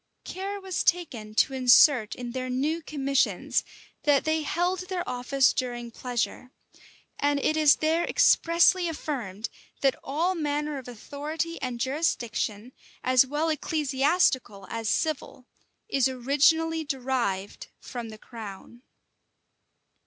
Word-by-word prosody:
Care 395 Hz, +2 st, -5 dB
was 380 Hz, -2 st, -2 dB
taken 240 Hz, -12 st, -1 dB
to 270 Hz, -, +3 dB
insert 250 Hz, -3 st, +5 dB
in 245 Hz, -1 st, -6 dB
their 255 Hz, +1 st, -4 dB
new 295 Hz, +6 st, -1 dB
commissions, 275 Hz, -3 st, 0 dB, 0.4 s
that 290 Hz, -2 st, +3 dB
they 315 Hz, 0 st, +1 dB
held 355 Hz, +4 st, -1 dB
their 360 Hz, -2 st, -3 dB
office 255 Hz, +2 st, +2 dB
during 240 Hz, -2 st, -4 dB
pleasure:[] 250 Hz, +1 st, -3 dB, 0.7 s
and 285 Hz, 0 st, +2 dB
it 310 Hz, -, +1 dB
is 305 Hz, -2 st, +6 dB
there 320 Hz, +2 st, +1 dB
expressly 345 Hz, -5 st, +4 dB
affirmed, 235 Hz, -, -4 dB, 0.3 s
that 270 Hz, -2 st, +4 dB
all 325 Hz, +7 st, 0 dB
manner 295 Hz, -3 st, -2 dB
of 255 Hz, -, -12 dB
authority 300 Hz, +7 st, -5 dB
and 250 Hz, -2 st, -3 dB
jurisdiction, 240 Hz, -5 st, -1 dB, 0.3 s
as 255 Hz, +1 st, +4 dB
well 300 Hz, +4 st, -1 dB
ecclesiastical 275 Hz, -, +1 dB
as 225 Hz, -2 st, -2 dB
civil, 290 Hz, -3 st, -2 dB, 0.4 s
is 270 Hz, -1 st, +2 dB
originally 295 Hz, +6 st, +2 dB
derived 250 Hz, -9 st, -2 dB
from 240 Hz, -2 st, -7 dB
the 215 Hz, -, -10 dB
crown. 220 Hz, +1 st, -10 dB
275 Hz, 120 wpm, -27 LUFS, 245-315 Hz, 0.7 s, is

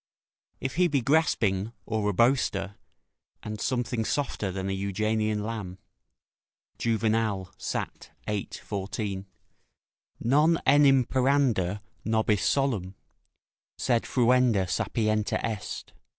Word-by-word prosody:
["If 130 Hz, +3 st, -4 dB
he 180 Hz, 0 st, +5 dB
be 145 Hz, -5 st, +1 dB
grasping, 115 Hz, -8 st, +1 dB
or 110 Hz, -2 st, 0 dB
a -, -, 0 dB
boaster, 105 Hz, -4 st, +2 dB, 0.7 s
and 105 Hz, -1 st, -5 dB
something 120 Hz, -2 st, -1 dB
softer 110 Hz, -6 st, -1 dB
than 95 Hz, +1 st, -4 dB
an 95 Hz, -, -1 dB
Euganean 105 Hz, +2 st, -1 dB
lamb." 105 Hz, -5 st, -5 dB, 1.0 s
Juvenal, 110 Hz, -4 st, 0 dB
Sat., -, -, -4 dB, 0.2 s
viii. 105 Hz, -2 st, -2 dB, 0.2 s
14.] 100 Hz, -1 st, -4 dB, 0.9 s
"Non 150 Hz, +7 st, +3 dB
enim 135 Hz, -2 st, +5 dB
paranda 125 Hz, -8 st, +1 dB, 0.2 s
nobis 110 Hz, -2 st, +1 dB
solum, 110 Hz, -10 st, 0 dB, 0.8 s
sed 120 Hz, -2 st, +1 dB
fruenda 125 Hz, -5 st, +3 dB
sapientia 110 Hz, +3 st, 0 dB
est." 110 Hz, -4 st, -4 dB
110 Hz, 100 wpm, -27 LUFS, 100-130 Hz, 1.0 s, he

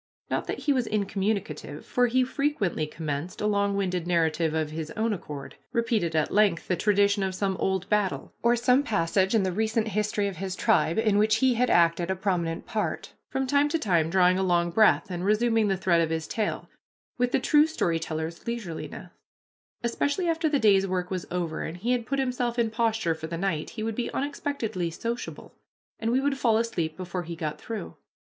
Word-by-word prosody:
Not -, -, -1 dB
that -, -, -4 dB
he 290 Hz, -, +2 dB
was 250 Hz, -4 st, 0 dB
incommunicative, 195 Hz, -7 st, -2 dB
for 245 Hz, 0 st, +2 dB
he 255 Hz, +2 st, +2 dB
frequently 250 Hz, -, -1 dB
commenced 155 Hz, +2 st, -5 dB
a -, -, -1 dB
longwinded 200 Hz, -4 st, 0 dB
narrative 165 Hz, -2 st, +1 dB
of 155 Hz, -1 st, -1 dB
his 160 Hz, 0 st, -5 dB
own 220 Hz, 0 st, +1 dB
accord 150 Hz, -7 st, -7 dB, 0.2 s
repeated 230 Hz, -8 st, 0 dB
at 155 Hz, -1 st, +1 dB
length 205 Hz, -5 st, +3 dB
the 180 Hz, -, +1 dB
tradition 200 Hz, +2 st, +2 dB
of 190 Hz, -1 st, -1 dB
some 195 Hz, 0 st, 0 dB
old 190 Hz, -1 st, -1 dB
battle, 210 Hz, -3 st, 0 dB
or 235 Hz, +1 st, +4 dB
some 250 Hz, +3 st, +3 dB
passage 190 Hz, -3 st, +1 dB
in 215 Hz, -, +3 dB
the 190 Hz, -, 0 dB
recent 220 Hz, +3 st, 0 dB
history 210 Hz, 0 st, 0 dB
of 195 Hz, -4 st, -5 dB
his 190 Hz, +1 st, -4 dB
tribe 165 Hz, -2 st, +2 dB
in 215 Hz, -2 st, +3 dB
which 215 Hz, +1 st, +4 dB
he 255 Hz, +3 st, +3 dB
had 250 Hz, +2 st, +1 dB
acted 170 Hz, +1 st, +3 dB
a 190 Hz, -, +1 dB
prominent 180 Hz, -4 st, -1 dB
part, 220 Hz, -3 st, -3 dB, 0.2 s
from 265 Hz, 0 st, -1 dB
time 285 Hz, +2 st, +3 dB
to 330 Hz, -, +1 dB
time 170 Hz, -, +1 dB
drawing 185 Hz, +1 st, +4 dB
a -, -, +1 dB
long 175 Hz, -2 st, +2 dB
breath, 215 Hz, 0 st, +4 dB
and 175 Hz, 0 st, -3 dB
resuming 220 Hz, +2 st, +2 dB
the 195 Hz, -1 st, +1 dB
thread 175 Hz, -2 st, +3 dB
of 165 Hz, -, 0 dB
his 160 Hz, 0 st, -2 dB
tale, 215 Hz, -2 st, -2 dB, 0.5 s
with 245 Hz, 0 st, +2 dB
the -, -, +2 dB
true 295 Hz, +4 st, +4 dB
story 170 Hz, -, 0 dB
teller's 160 Hz, +2 st, -5 dB
leisureliness. 220 Hz, -9 st, -5 dB, 0.7 s
Especially 285 Hz, +9 st, 0 dB
after 325 Hz, -1 st, +1 dB
the 295 Hz, -, +2 dB
day's 200 Hz, -5 st, +4 dB
work 180 Hz, -1 st, -2 dB
was 185 Hz, -3 st, -3 dB
over, 170 Hz, -3 st, -2 dB
and 165 Hz, -, -5 dB
he 230 Hz, +7 st, -1 dB
had 240 Hz, -3 st, 0 dB
put 275 Hz, -, -1 dB
himself 250 Hz, -2 st, -1 dB
in 230 Hz, -2 st, +1 dB
posture 225 Hz, -6 st, +1 dB
for 160 Hz, 0 st, -7 dB
the 165 Hz, +1 st, -4 dB
night, 170 Hz, -4 st, -1 dB
he 215 Hz, -, -6 dB
would 225 Hz, 0 st, -1 dB
be 245 Hz, -, -2 dB
unexpectedly 270 Hz, -10 st, -2 dB
sociable, 235 Hz, +8 st, -5 dB, 0.5 s
and 225 Hz, -, -1 dB
we 255 Hz, -, +3 dB
would 275 Hz, 0 st, 0 dB
fall 225 Hz, -4 st, +3 dB
asleep 170 Hz, -9 st, -2 dB
before 185 Hz, 0 st, -4 dB
he 170 Hz, 0 st, -6 dB
got 155 Hz, -2 st, -4 dB
through. 225 Hz, -2 st, -6 dB
200 Hz, 200 wpm, -27 LUFS, 170-235 Hz, 0.7 s, or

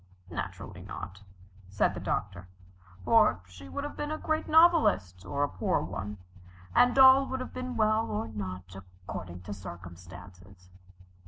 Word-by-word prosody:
"Naturally 85 Hz, -, -6 dB
not," 95 Hz, +2 st, -8 dB, 0.5 s
said 100 Hz, 0 st, +1 dB
the -, -, -6 dB
Doctor, 90 Hz, +1 st, -3 dB, 0.6 s
"for 90 Hz, -, +4 dB
she 90 Hz, 0 st, -13 dB
would 90 Hz, -, -4 dB
have 290 Hz, -, -6 dB
been 295 Hz, -, -4 dB
a 310 Hz, -, -2 dB
great 315 Hz, 0 st, -2 dB
novelist, 310 Hz, -, +4 dB
or 140 Hz, +11 st, -1 dB
a -, -, +2 dB
poor 95 Hz, -8 st, 0 dB
one, 105 Hz, +2 st, -5 dB, 0.6 s
and 245 Hz, +1 st, +4 dB
all 265 Hz, 0 st, +8 dB
would 260 Hz, -, -3 dB
have 255 Hz, -, -6 dB
been 255 Hz, -1 st, -5 dB
well, 215 Hz, 0 st, +2 dB
or 110 Hz, +2 st, -2 dB
not, 95 Hz, -3 st, -7 dB, 0.3 s
according 90 Hz, -1 st, -6 dB
to 100 Hz, +3 st, -7 dB
circumstances." 90 Hz, 0 st, -12 dB
100 Hz, 150 wpm, -29 LUFS, -, 0.6 s, all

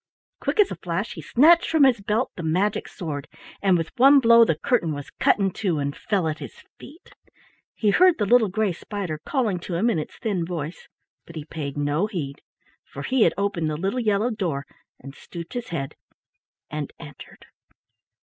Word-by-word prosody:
Quick -, -, -2 dB
as 410 Hz, -, +5 dB
a -, -, -3 dB
flash 180 Hz, +5 st, -3 dB
he -, -, -8 dB
snatched 330 Hz, +7 st, +4 dB
from 320 Hz, -3 st, +4 dB
his 250 Hz, -6 st, +4 dB
belt 215 Hz, +5 st, -1 dB
the -, -, -6 dB
magic 180 Hz, +6 st, 0 dB
sword, 150 Hz, -6 st, -6 dB, 0.3 s
and 190 Hz, -3 st, +4 dB
with 165 Hz, -1 st, -3 dB
one 275 Hz, +3 st, +7 dB
blow 235 Hz, -2 st, +7 dB
the 165 Hz, -8 st, +2 dB
curtain 200 Hz, -, 0 dB
was 145 Hz, -1 st, -8 dB
cut -, -, +4 dB
in 195 Hz, -2 st, 0 dB
two, 185 Hz, -5 st, -1 dB
and 140 Hz, 0 st, -2 dB
fell 190 Hz, -6 st, -1 dB
at 155 Hz, 0 st, -3 dB
his -, -, -9 dB, 0.2 s
feet. 325 Hz, -, -14 dB, 0.6 s
He 210 Hz, -2 st, +2 dB
heard 365 Hz, -, +5 dB
the 210 Hz, -, 0 dB
little 235 Hz, +1 st, +5 dB
gray 205 Hz, 0 st, 0 dB
spider 175 Hz, -4 st, -5 dB
calling 225 Hz, -10 st, -1 dB
to 175 Hz, 0 st, -5 dB
him 225 Hz, +8 st, +2 dB
in 165 Hz, -, 0 dB
its 155 Hz, -, -7 dB
thin 200 Hz, -6 st, -2 dB
voice, 165 Hz, -1 st, -6 dB, 0.4 s
but 170 Hz, -, -12 dB
he 155 Hz, -2 st, -6 dB
paid 145 Hz, -3 st, -6 dB
no 145 Hz, +7 st, 0 dB
heed, 150 Hz, -9 st, -5 dB, 0.4 s
for -, -, -9 dB
he 260 Hz, -2 st, 0 dB
had -, -, +2 dB
opened 195 Hz, -5 st, -1 dB
the 150 Hz, -, -3 dB
little 195 Hz, +9 st, -1 dB
yellow 215 Hz, +1 st, +1 dB
door 170 Hz, -10 st, -3 dB, 0.3 s
and 135 Hz, -, -10 dB
stooped 170 Hz, +3 st, -10 dB
his 245 Hz, -2 st, -4 dB
head 135 Hz, -5 st, -4 dB, 0.8 s
and 150 Hz, -2 st, -4 dB
entered. 145 Hz, -2 st, -13 dB
190 Hz, 195 wpm, -24 LUFS, 155-230 Hz, 0.8 s, one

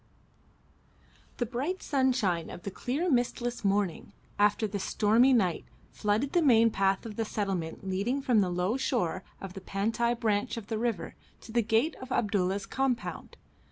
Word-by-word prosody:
The 240 Hz, -, 0 dB
bright 270 Hz, +11 st, -3 dB
sunshine 250 Hz, -, +1 dB
of 175 Hz, -, -9 dB
the 200 Hz, -, -4 dB
clear 275 Hz, -, -2 dB
mistless 245 Hz, -4 st, 0 dB
morning, 200 Hz, -3 st, 0 dB, 0.3 s
after 210 Hz, +1 st, +3 dB
the 205 Hz, -1 st, -3 dB
stormy 225 Hz, +7 st, +3 dB
night, 190 Hz, -9 st, +2 dB, 0.3 s
flooded 215 Hz, +7 st, 0 dB
the 350 Hz, -, +4 dB
main 230 Hz, -6 st, +5 dB
path 195 Hz, 0 st, +1 dB
of 215 Hz, -2 st, -7 dB
the 225 Hz, -, +1 dB
settlement 195 Hz, -5 st, -3 dB
leading 200 Hz, +9 st, 0 dB
from 245 Hz, -6 st, +3 dB
the 185 Hz, -, +1 dB
low 180 Hz, +7 st, 0 dB
shore 190 Hz, -9 st, -1 dB, 0.2 s
of 195 Hz, -2 st, -7 dB
the 195 Hz, -, -8 dB
Pantai 225 Hz, +5 st, 0 dB
branch 210 Hz, -1 st, 0 dB
of 220 Hz, -2 st, -7 dB
the 220 Hz, -2 st, -1 dB
river 230 Hz, -6 st, -2 dB, 0.3 s
to 225 Hz, -, -11 dB
the 235 Hz, +1 st, +3 dB
gate 225 Hz, +8 st, +1 dB
of 260 Hz, 0 st, -9 dB
Abdulla's 200 Hz, -3 st, 0 dB
compound. 265 Hz, -2 st, -2 dB
220 Hz, 160 wpm, -29 LUFS, 195-245 Hz, 0.3 s, main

